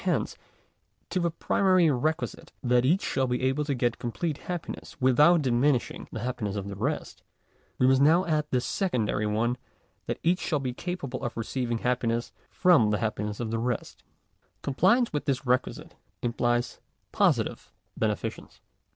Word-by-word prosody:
Hence, - - 0 0.8
to 185 - +1
the 170 -1 +1
primary 180 0 +3
requisite 155 +5 -2
that 125 0 +3
each 170 +8 +3
shall 130 -1 0
be 125 +1 -1
able 135 +3 +1
to 140 -2 -1
get 120 -1 0
complete 145 +6 -3
happiness 175 -5 -6
without 150 +6 +5
diminishing 125 +1 +1
the 110 - -5
happiness 120 -5 -3
of 100 -1 -4
the 100 - -6
rest, 135 +10 -3 0.6
we 125 - +3
must 130 +1 +4
now 165 +6 +5
add 155 -2 +1
the 125 - +1
secondary 115 - 0
one 120 +4 0 0.5
that - - -2
each 175 +2 +3
shall 155 - 0
be 130 -3 -3
capable 140 -5 -5
of 120 -2 -4
receiving 120 +1 -2
happiness 120 -1 -1 0.2
from 170 - +4
the 105 - +1
happi 105 -2 -2
ness 105 -1 -6
of 115 -2 -3
the 115 - -1
rest. 120 0 -3 0.6
Compliance 190 - +3
with 150 - -2
this 135 -1 -1
requisite 125 +1 -1 0.3
implies 120 0 0 0.3
posi - - +3
tive - - -9 0.2
beneficence. - - -3
130 Hz, 160 wpm, -27 LUFS, 120-155 Hz, 0.8 s, without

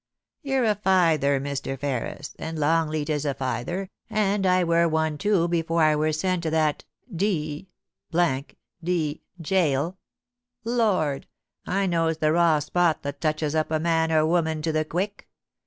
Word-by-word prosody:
You're 270 -4 0
a 215 - +3
feyther, 165 -9 +2
Mr. 140 -1 -4
Ferris, 140 +1 -4
and 160 0 -5
Longleat 155 0 +1
is 150 -2 -1
a 140 -3 -1
feyther, 155 +9 -3 0.2
and 205 -2 +1
I 185 0 +4
wur 170 0 +3
one 160 -2 0
too 205 -4 +2
afore 170 -1 +1
I 155 -1 +4
wur 155 +1 +1
sent 180 +3 0
to 165 - -1
that 155 -2 0 0.3
d 160 -4 -1 1.1
d 160 -3 -1 0.2
gaol. 165 -1 +1 0.7
Lord! 205 - +1 0.4
I 195 +2 +1
knows 165 -3 +1
the 155 -1 +2
raw 165 -1 +4
spot 165 +2 +1
that 140 0 -5
touches 155 -1 0
up 155 -1 0
man 160 +1 +1
or 155 -1 +4
woman 160 -2 0
to 160 - 0
the 155 0 0
quick. 195 +6 -4
160 Hz, 150 wpm, -25 LUFS, 155-180 Hz, 1.1 s, I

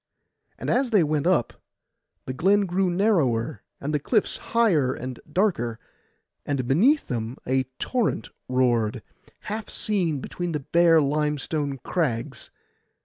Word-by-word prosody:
And - - -3
as 260 0 +2
they 210 -6 +4
went 150 +1 0
up, 175 -11 +2 0.7
the 130 - -4
glen 195 +8 +3
grew 185 +1 +1
narrower, 160 - +1 0.2
and 145 +2 -3
the 150 - +2
cliffs 215 - +1
higher 180 - +2
and 130 0 -6
darker, 150 - 0 0.7
and 135 -4 -2
beneath 240 - +4
them 115 0 -4
a 130 +1 +1
torrent 240 - -1 0.2
roared, 120 -4 +1 0.4
half 215 0 -5
seen 175 -9 -1
between 175 +5 -4
bare 165 +3 +4
limestone 150 0 -1
crags. 125 -10 -2
150 Hz, 125 wpm, -25 LUFS, 130-195 Hz, 0.7 s, they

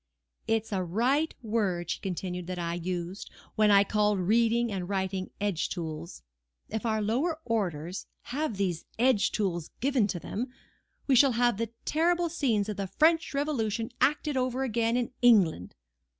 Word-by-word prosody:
"It 225 -1 +2
was 220 - -16
a 190 -2 0
right 250 - +1
word," 205 -6 -1
she - - -3
continued, 180 -1 -4
"that 185 0 -4
I 170 -1 -2
used, 175 +2 -4 0.2
when 215 -1 +3
I 200 -1 +7
called 210 0 +1
reading 230 +4 +2
and 185 -2 -4
writing 190 -1 -2
'edge 200 -5 -1
tools.' 165 - -6 0.5
If 220 +2 -3
our 220 -1 0
lower 285 +10 0
orders 180 -6 -2 0.3
have 285 -7 -1
these 180 -4 -1
edge 235 -4 +3
tools 175 -6 -2
given 260 -5 +2
to 180 - -3
them, 230 +8 -4 0.6
we 275 - +2
shall 260 +1 +6
have 240 -2 +2
the 230 0 -2 0.2
terrible 340 +2 +2
scenes 235 -11 0
of 210 - -4
the 200 -1 -2
French 320 - +2
Revolution 230 -7 -1
acted 295 0 +2
over 255 +1 0
again 235 -1 +1
in 245 -1 -1
England. 185 - +4
215 Hz, 165 wpm, -29 LUFS, 185-245 Hz, 0.6 s, I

